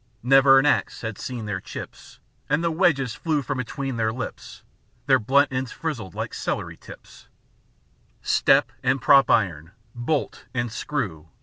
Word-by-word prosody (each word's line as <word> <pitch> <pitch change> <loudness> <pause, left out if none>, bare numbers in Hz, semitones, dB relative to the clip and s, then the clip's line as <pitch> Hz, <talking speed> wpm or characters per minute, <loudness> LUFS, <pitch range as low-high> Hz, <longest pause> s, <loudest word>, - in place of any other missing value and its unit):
Never 135 +1 +6
an 135 - +4
axe 145 - +1
had 110 -3 -5
seen 120 -4 -5
their 100 -3 -3
chips, - - -10 0.3
And 150 +4 +1
the 170 - +1
wedges 155 - +1
flew 155 -4 -1
from 140 0 -3
between 135 +1 -4
their 110 -1 +1
lips; 125 +3 -7 0.4
Their 130 -1 +4
blunt 135 +5 +2
ends 130 -1 -2
frizzled 115 - -5
like - - -4
celery - - -3
tips; - - -15 0.9
Step 135 -2 +3
and 130 +1 +1
prop 135 -2 +5
iron, 85 -5 +1 0.2
bolt 130 +5 -2
and 120 -2 -1
screw. 100 - -4
130 Hz, 150 wpm, -24 LUFS, 110-140 Hz, 0.9 s, Never